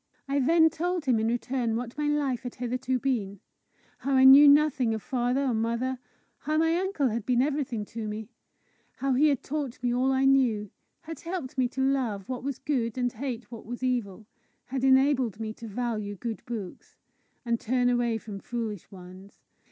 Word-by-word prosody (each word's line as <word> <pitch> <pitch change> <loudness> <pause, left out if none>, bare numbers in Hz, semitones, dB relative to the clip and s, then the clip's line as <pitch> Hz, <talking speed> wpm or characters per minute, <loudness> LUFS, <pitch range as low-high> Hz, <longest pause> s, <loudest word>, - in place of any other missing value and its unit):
I 280 +1 +1
then 320 +4 +4
told 350 -1 -2
him 245 -4 +3
in 220 - 0
return 240 0 -1
what 235 0 -4
my 295 +1 -1
life 285 -4 0
had 245 -2 -7
hitherto 255 +1 -2
been; 220 -7 -2 0.6
how 275 - -2
I 260 - +5
knew 275 +2 +10
nothing 280 -5 +4
of 220 - -7
father 250 0 0
or 260 -3 +1
mother; 235 +3 -1 0.4
how 310 +1 -1
my 325 +1 +3
uncle 360 -7 0
had 230 0 -3
been 245 +2 +1
everything 275 -7 -2
to 225 0 -6
me; 210 0 -5 0.7
how 270 -1 0
he 285 +5 +4
had 280 -4 0
taught 280 -4 -4
me 245 -1 +1
all 255 +2 +2
I 265 0 +2
knew, 240 -7 +2 0.3
had 325 0 -8
helped 340 -6 -5
me 255 -1 +2
to 265 +2 -4
love 255 -8 0
what 255 -1 -5
was 275 -2 -3
good 250 -6 -2
and 245 -1 0
hate 245 -1 -5
what 230 -3 -10
was 245 +2 -6
evil, 225 -5 -2 0.4
had 260 0 -4
enabled 265 -4 +3
me 220 -1 -4
to 230 - -10
value 215 -2 -3
good 225 +3 -5
books, 215 -6 -7 0.5
and 235 -1 0
turn 245 +2 +1
away 240 -2 +1
from 210 -2 -8
foolish 220 -4 -5
ones. 185 +1 -13
250 Hz, 190 wpm, -27 LUFS, 225-275 Hz, 0.7 s, knew